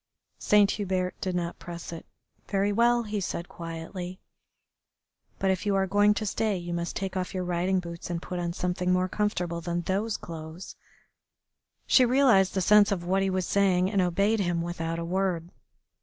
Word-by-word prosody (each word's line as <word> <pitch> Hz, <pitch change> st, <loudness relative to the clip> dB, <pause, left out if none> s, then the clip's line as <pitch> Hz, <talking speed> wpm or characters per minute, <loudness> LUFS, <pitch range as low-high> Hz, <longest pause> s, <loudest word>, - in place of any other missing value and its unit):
Saint 205 Hz, -1 st, +4 dB
Hubert 185 Hz, -3 st, -1 dB
did 185 Hz, -1 st, -2 dB
not 170 Hz, -1 st, -3 dB
press 170 Hz, -1 st, -7 dB
it. 165 Hz, -, -9 dB, 0.4 s
"Very 200 Hz, 0 st, +1 dB
well," 235 Hz, +3 st, +3 dB
he 210 Hz, -2 st, -3 dB
said 170 Hz, -1 st, -4 dB
quietly, 175 Hz, +2 st, -7 dB, 1.2 s
"but 190 Hz, 0 st, +1 dB
if 185 Hz, -, -1 dB
you 205 Hz, -1 st, +1 dB
are 195 Hz, 0 st, +2 dB
going 205 Hz, +2 st, +3 dB
to 215 Hz, -, -2 dB
stay 210 Hz, 0 st, 0 dB
you 175 Hz, -1 st, -5 dB
must 170 Hz, 0 st, -3 dB
take 195 Hz, -1 st, -3 dB
off 185 Hz, 0 st, -3 dB
your 185 Hz, -, -1 dB
riding 180 Hz, +2 st, 0 dB
boots 170 Hz, -1 st, -7 dB
and 170 Hz, -1 st, -2 dB
put 180 Hz, +1 st, -5 dB
on 170 Hz, -1 st, -2 dB
something 180 Hz, +1 st, -1 dB
more 185 Hz, 0 st, +2 dB
comfortable 180 Hz, -4 st, -1 dB
than 175 Hz, +1 st, -2 dB
those 200 Hz, +5 st, -1 dB
clothes." 160 Hz, +1 st, -8 dB, 1.1 s
She 255 Hz, -, +5 dB
realised 240 Hz, -7 st, +4 dB
the 190 Hz, -, +1 dB
sense 210 Hz, +2 st, +5 dB
of 175 Hz, -3 st, -2 dB
what 190 Hz, +2 st, +1 dB
he 195 Hz, -, +1 dB
was 185 Hz, -1 st, -1 dB
saying, 190 Hz, -1 st, +2 dB
and 200 Hz, -3 st, +2 dB
obeyed 200 Hz, +5 st, +2 dB
him 175 Hz, -3 st, 0 dB
without 165 Hz, -1 st, -3 dB
a 170 Hz, -, -3 dB
word. 180 Hz, -1 st, -1 dB
185 Hz, 185 wpm, -27 LUFS, 175-200 Hz, 1.2 s, She